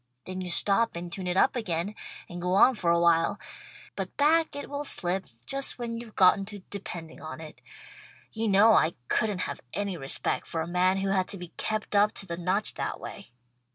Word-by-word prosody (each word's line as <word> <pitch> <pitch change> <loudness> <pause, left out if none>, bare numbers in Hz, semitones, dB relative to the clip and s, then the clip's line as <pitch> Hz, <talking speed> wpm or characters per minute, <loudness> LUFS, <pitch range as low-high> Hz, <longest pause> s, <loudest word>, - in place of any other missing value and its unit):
Then 185 0 -5
you 180 - -5
stop 205 +5 +2
and 170 0 -6
tune 185 0 -4
it 180 +1 0
up 265 - +4
again, 195 -4 -1 0.3
and 175 0 -7
go 180 +1 0
on 255 +6 +7
for 185 -7 -1
awhile, 170 +3 +3 0.6
but - - -5
back 315 +2 +3
it 285 - -5
will 285 0 -4
slip 185 -7 -2 0.2
just 275 0 0
when 235 -2 -4
you've 230 -2 -8
gotten 190 +1 +5
to 205 -1 -8
depending 175 -6 -7
on 155 +1 -7
it. 155 -1 -11 0.7
You 225 0 -2
know 210 +3 +6
I 160 -3 +3
couldn't 210 -4 +1
have 140 - -4
any 200 -3 -2
respect 135 -3 -1
for 165 - -2
a 160 - -3
man 180 +2 +2
who 195 0 -1
had 190 -1 +1
to 200 - -5
be 175 -2 -8
kept 215 +3 -3
up 205 +1 +4
to - - -5
the 170 -3 -4
notch 185 +5 0
that - - -4
way. - - -9
195 Hz, 205 wpm, -28 LUFS, 175-215 Hz, 0.7 s, on